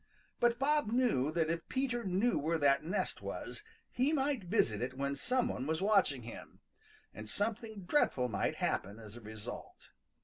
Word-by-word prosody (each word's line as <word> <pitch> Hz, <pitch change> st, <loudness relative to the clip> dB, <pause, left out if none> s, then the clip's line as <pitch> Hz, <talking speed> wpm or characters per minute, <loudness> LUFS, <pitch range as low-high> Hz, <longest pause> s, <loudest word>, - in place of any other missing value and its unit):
But 240 Hz, 0 st, +3 dB
Bob 290 Hz, -3 st, +2 dB
knew 230 Hz, -, +2 dB
that 165 Hz, -1 st, +1 dB
if 165 Hz, 0 st, -3 dB
Peter 255 Hz, -3 st, 0 dB
knew 195 Hz, +4 st, +2 dB
where 160 Hz, +3 st, +1 dB
that 140 Hz, -1 st, +4 dB
nest 180 Hz, +6 st, -2 dB
was -, -, -6 dB, 0.3 s
he 265 Hz, +5 st, +2 dB
might 270 Hz, -7 st, 0 dB
visit 120 Hz, -, +2 dB
it 130 Hz, +1 st, -3 dB
when 140 Hz, +1 st, -1 dB
some 250 Hz, -, +1 dB
one 135 Hz, -, -3 dB
was 160 Hz, 0 st, 0 dB
watching 190 Hz, -, +3 dB
him, 115 Hz, -, -10 dB, 0.5 s
and 110 Hz, +1 st, -8 dB
something 215 Hz, -, -2 dB
dreadful 175 Hz, -, +2 dB
might 100 Hz, -5 st, -1 dB
happen 100 Hz, +2 st, -1 dB
as 110 Hz, -1 st, -9 dB
a 120 Hz, -, -10 dB
result. 110 Hz, -1 st, -8 dB
175 Hz, 170 wpm, -34 LUFS, -, 0.5 s, that